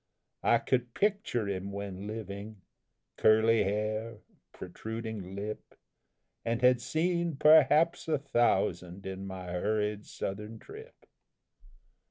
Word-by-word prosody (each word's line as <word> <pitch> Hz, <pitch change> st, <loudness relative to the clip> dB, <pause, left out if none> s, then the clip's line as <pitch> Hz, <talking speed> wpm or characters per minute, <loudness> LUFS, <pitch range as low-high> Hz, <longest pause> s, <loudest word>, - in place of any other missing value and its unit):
I 120 Hz, -, +4 dB
could 125 Hz, 0 st, -1 dB
picture 200 Hz, -, 0 dB
him 100 Hz, 0 st, -3 dB
when 100 Hz, 0 st, -6 dB
living 105 Hz, -2 st, -7 dB, 0.5 s
curly 110 Hz, +1 st, +5 dB
hair, 110 Hz, +3 st, -2 dB, 0.3 s
protruding 110 Hz, -4 st, -6 dB
lip 105 Hz, +2 st, -6 dB, 0.7 s
And 115 Hz, +1 st, -1 dB
had 125 Hz, -1 st, +5 dB
seen 170 Hz, +2 st, 0 dB
perhaps 155 Hz, +3 st, +5 dB
a 155 Hz, -2 st, +2 dB
thousand 95 Hz, -9 st, 0 dB
in 95 Hz, 0 st, -5 dB
my 95 Hz, -2 st, -7 dB
hurried 105 Hz, +3 st, -1 dB
Southern 105 Hz, +3 st, -5 dB
trip. 445 Hz, -, -13 dB
110 Hz, 105 wpm, -30 LUFS, 100-125 Hz, 0.7 s, curly